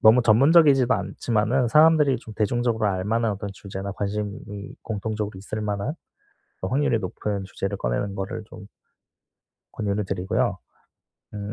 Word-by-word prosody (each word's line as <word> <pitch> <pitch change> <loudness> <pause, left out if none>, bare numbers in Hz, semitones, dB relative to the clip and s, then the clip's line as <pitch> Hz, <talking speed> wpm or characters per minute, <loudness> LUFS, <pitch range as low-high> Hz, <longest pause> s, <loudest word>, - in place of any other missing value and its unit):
너무 115 +3 +7
전문적이지도 135 +2 +5
않지만은 110 +4 0
사람들이 150 -1 +5
좀 110 - -11
대중적으로 115 0 +1
알 95 -2 -1
만한 115 +1 +1
어떤 100 0 -5
주제나 95 0 -6
관심이 105 +1 -5
공통적으로 105 -2 -3
있을 105 +3 -5
만한 105 +6 -2 0.7
어 - - -2
확률이 135 -2 +2
높은 100 +1 -3
주제를 100 +1 -4
꺼내는 95 +9 -2
거를 95 +2 -4
좀 105 -2 -11 1.1
권유를 105 -1 -1
드리고요. 95 -1 -1 0.8
음 105 0 -5
105 Hz, 340 characters per minute, -24 LUFS, 100-120 Hz, 1.1 s, 너무